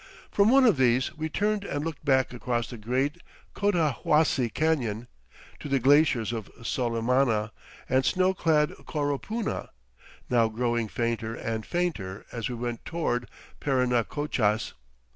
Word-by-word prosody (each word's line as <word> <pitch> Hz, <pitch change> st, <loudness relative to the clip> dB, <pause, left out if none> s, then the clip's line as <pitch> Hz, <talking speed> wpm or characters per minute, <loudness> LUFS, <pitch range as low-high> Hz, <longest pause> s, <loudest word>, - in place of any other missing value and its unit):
From 205 Hz, +1 st, +4 dB
one 265 Hz, +1 st, +6 dB
of 220 Hz, -, +5 dB
these 130 Hz, +3 st, +2 dB
we 160 Hz, 0 st, -3 dB
turned 210 Hz, +4 st, 0 dB
and 145 Hz, -6 st, -3 dB
looked 165 Hz, -2 st, -5 dB
back 130 Hz, -3 st, +2 dB
across 120 Hz, -1 st, -2 dB
the 120 Hz, -, -7 dB
great 130 Hz, +9 st, -1 dB, 0.3 s
Cotahuasi 155 Hz, -, +2 dB
Canyon, 120 Hz, -8 st, 0 dB, 0.5 s
to 145 Hz, -, -7 dB
the 135 Hz, -, +3 dB
glaciers 130 Hz, -4 st, +3 dB
of 110 Hz, -3 st, -5 dB
Solimana 115 Hz, -2 st, +1 dB, 0.4 s
and 130 Hz, +1 st, +2 dB
snow 185 Hz, +6 st, +2 dB
clad 160 Hz, -3 st, +2 dB, 0.2 s
Coropuna, 150 Hz, -, -2 dB, 0.6 s
now 120 Hz, -2 st, +3 dB
growing 120 Hz, 0 st, -1 dB
fainter 115 Hz, 0 st, -2 dB
and 110 Hz, -1 st, -3 dB
fainter 135 Hz, -, -2 dB
as 115 Hz, -1 st, -3 dB
we 125 Hz, -, -4 dB
went 120 Hz, -1 st, -4 dB
toward 125 Hz, -7 st, -2 dB, 0.3 s
Parinacochas. 125 Hz, -4 st, 0 dB
130 Hz, 130 wpm, -27 LUFS, 115-155 Hz, 0.6 s, one